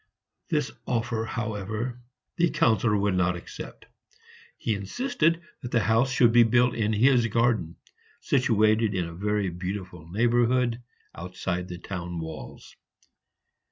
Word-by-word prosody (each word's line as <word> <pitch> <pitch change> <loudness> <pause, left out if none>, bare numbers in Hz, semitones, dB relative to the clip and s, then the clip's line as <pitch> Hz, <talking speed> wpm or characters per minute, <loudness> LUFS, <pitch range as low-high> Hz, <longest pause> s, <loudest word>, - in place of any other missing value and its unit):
This 150 -5 0 0.2
offer, 115 -2 -1
however, 110 +2 -4 0.4
the 170 -1 +3
Councillor 115 -9 +2
would 100 -1 +1
not 90 -1 +2
accept; 85 - -9 0.7
he 110 - -1
insisted 165 - 0 0.2
that 120 - -5
the 115 -2 +2
house 115 +4 +2
should 125 -3 +4
be 120 +1 +6
built 120 +2 +4
in 110 -1 0
his 120 +2 +4
garden, 115 -7 +1 0.4
situated 110 -4 +2
in 90 -2 0
a 85 - -8
very 100 +1 -1
beautiful 90 -2 -6
neighborhood 120 +3 +2 0.3
outside 90 +1 -4
the 90 - -7
town 90 -1 -6
walls. 80 -1 -8
110 Hz, 125 wpm, -26 LUFS, 95-120 Hz, 0.7 s, be